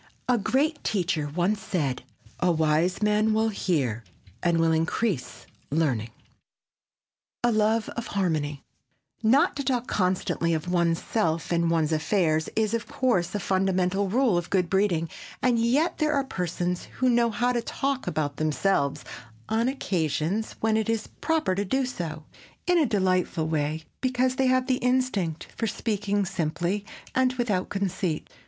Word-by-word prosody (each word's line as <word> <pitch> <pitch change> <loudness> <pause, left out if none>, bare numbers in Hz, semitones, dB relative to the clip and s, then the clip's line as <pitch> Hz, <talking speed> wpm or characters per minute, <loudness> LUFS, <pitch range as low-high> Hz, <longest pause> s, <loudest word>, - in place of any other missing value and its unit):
A 250 -2 +3
great 295 +8 0
teacher 170 -7 0
once 195 +4 +1
said, 140 -12 -1 0.4
"A 180 - +3
wise 160 +4 +1
man 210 +1 +3
will 220 +1 +2
hear 140 - -1 0.4
and 170 -1 +2
will 165 0 +3
increase 160 - -1 0.2
learning." 135 -8 0
[Sidenote: - - -39
A 240 - +4
LOVE 220 +1 +1
OF 235 - -5
HARMONY] 155 -7 -1 0.6
Not 230 +5 +4
to 280 - -2
talk 250 -3 0
constantly 180 -4 0
of 160 +2 -4
one's 170 -1 +1
self 165 -8 -1
and 170 -1 +2
one's 165 -2 +1
affairs 160 0 +1
is, 220 0 +1
of 230 0 -2
course, 255 -11 0
a - - 0
fundamental 190 0 +1
rule 230 -4 +3
of 175 - -7
good 180 -2 +1
breeding 190 -4 +2 0.3
and 245 -2 +2
yet 265 +9 +2
there 305 -1 +2
are 275 - +2
persons 180 - -2
who 255 - +1
know 235 -1 +4
how 240 +3 +1
to 240 -1 0
talk 270 +1 -2
about 145 -5 -1
themselves—on 150 - -1
occasions 185 - -1
when 220 -1 +2
it 220 0 -1
is 225 -1 0 0.2
proper 320 - +1
to 200 +2 -1
do 265 +7 0
so—in 170 - -4
a 300 - +3
delightful 185 -6 +1
way, 155 0 -1 0.2
because 255 0 +1
they 265 - +3
have 255 0 +3
the 255 -1 +1
instinct 250 -11 0
for 225 - -1
speaking 205 -2 -1
simply 175 +2 -1 0.3
and 255 0 +2
without 225 -7 -1
conceit. 190 -5 -2
195 Hz, 150 wpm, -26 LUFS, 165-235 Hz, 0.6 s, A